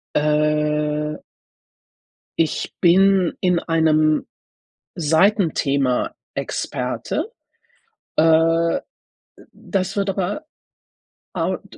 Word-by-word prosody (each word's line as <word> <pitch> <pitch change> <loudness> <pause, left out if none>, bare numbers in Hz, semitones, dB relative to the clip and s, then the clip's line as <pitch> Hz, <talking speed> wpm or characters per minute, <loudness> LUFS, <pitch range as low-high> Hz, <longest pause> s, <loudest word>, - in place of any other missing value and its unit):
Äh. 150 0 0 1.2
Ich 160 - -1
bin 190 0 +4
in 180 -2 +2
einem 155 -2 +2 0.7
Seitenthema 160 - +1 0.2
Experte. 450 - -3 0.8
Äh, 165 +1 +3 0.7
das 195 +1 -3
wird 200 -1 0
aber 195 - -2 0.9
au - - -1
d - - -15
165 Hz, 65 wpm, -21 LUFS, 150-185 Hz, 1.2 s, bin